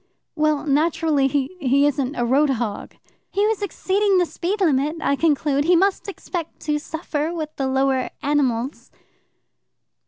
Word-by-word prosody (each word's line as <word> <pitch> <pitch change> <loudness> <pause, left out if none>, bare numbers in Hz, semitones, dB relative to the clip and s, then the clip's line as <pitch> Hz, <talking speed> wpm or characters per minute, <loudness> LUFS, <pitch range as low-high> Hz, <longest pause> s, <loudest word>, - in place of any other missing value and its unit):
"Well, 305 -1 +1
naturally 300 -1 +2
he 275 +5 -1
he 280 -1 +3
isn't 280 -1 0
a 240 - 0
road 280 +5 +3
hog." 235 -5 -3 0.3
"He 405 +1 +1
was 435 -1 0
exceeding 400 0 +1
the 355 - +3
speed 365 +5 -3
limit, 300 -4 +2
I 280 - +1
conclude. 290 -2 +1
He 355 +2 +5
must 390 +4 +1
expect 350 -4 -6
to 300 -1 -1
suffer 315 0 -3
with 310 -3 -5
the 270 - -1
lower 265 -1 +1
animals." 275 -3 -1
295 Hz, 150 wpm, -22 LUFS, 275-340 Hz, 0.3 s, He